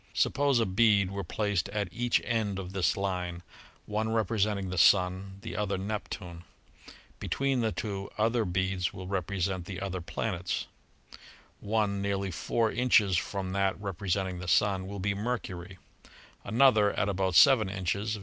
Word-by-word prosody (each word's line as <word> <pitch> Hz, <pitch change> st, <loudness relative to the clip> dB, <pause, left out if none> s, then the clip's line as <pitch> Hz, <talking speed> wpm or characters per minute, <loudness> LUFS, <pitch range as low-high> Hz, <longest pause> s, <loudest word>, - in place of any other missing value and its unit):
Suppose 140 Hz, -3 st, +2 dB
a 115 Hz, -, +2 dB
bead 100 Hz, -1 st, +3 dB
were 100 Hz, 0 st, -4 dB
placed 100 Hz, +1 st, -1 dB
at 100 Hz, -1 st, -2 dB
each 120 Hz, +3 st, +1 dB
end 110 Hz, -4 st, -1 dB
of 95 Hz, -1 st, -6 dB
this 95 Hz, -2 st, +1 dB
line, 90 Hz, -3 st, -3 dB, 0.4 s
one 110 Hz, +1 st, -1 dB
representing 105 Hz, -3 st, 0 dB
the 90 Hz, -, -4 dB
Sun, 95 Hz, +1 st, +3 dB
the -, -, -6 dB
other 100 Hz, -2 st, -1 dB
Nep 105 Hz, +2 st, -4 dB
tune. 85 Hz, -3 st, -7 dB, 0.8 s
Between 135 Hz, -2 st, 0 dB
the 110 Hz, -1 st, +1 dB
two, 100 Hz, +1 st, -4 dB
other 115 Hz, +2 st, +2 dB
beads 95 Hz, -1 st, -1 dB
will 95 Hz, -, -8 dB
represent 95 Hz, -1 st, -2 dB
the 95 Hz, 0 st, -6 dB
other 95 Hz, -2 st, -4 dB
planets. 90 Hz, +1 st, -3 dB, 0.9 s
One 100 Hz, -2 st, 0 dB
nearly 100 Hz, -1 st, -1 dB
four 110 Hz, +7 st, 0 dB
inches 110 Hz, -6 st, +3 dB
from 95 Hz, +1 st, -2 dB
that 100 Hz, 0 st, 0 dB
representing 95 Hz, -2 st, -2 dB
the 90 Hz, -, -7 dB
Sun 95 Hz, +1 st, +2 dB
will 100 Hz, +1 st, -6 dB
be 100 Hz, +2 st, 0 dB
Mercury; 95 Hz, -5 st, -4 dB, 0.7 s
another, 110 Hz, -4 st, +4 dB
at 95 Hz, -, 0 dB
about 95 Hz, -2 st, 0 dB
seven 115 Hz, -, +6 dB
inches. 100 Hz, +3 st, -2 dB
100 Hz, 150 wpm, -29 LUFS, 95-110 Hz, 0.9 s, seven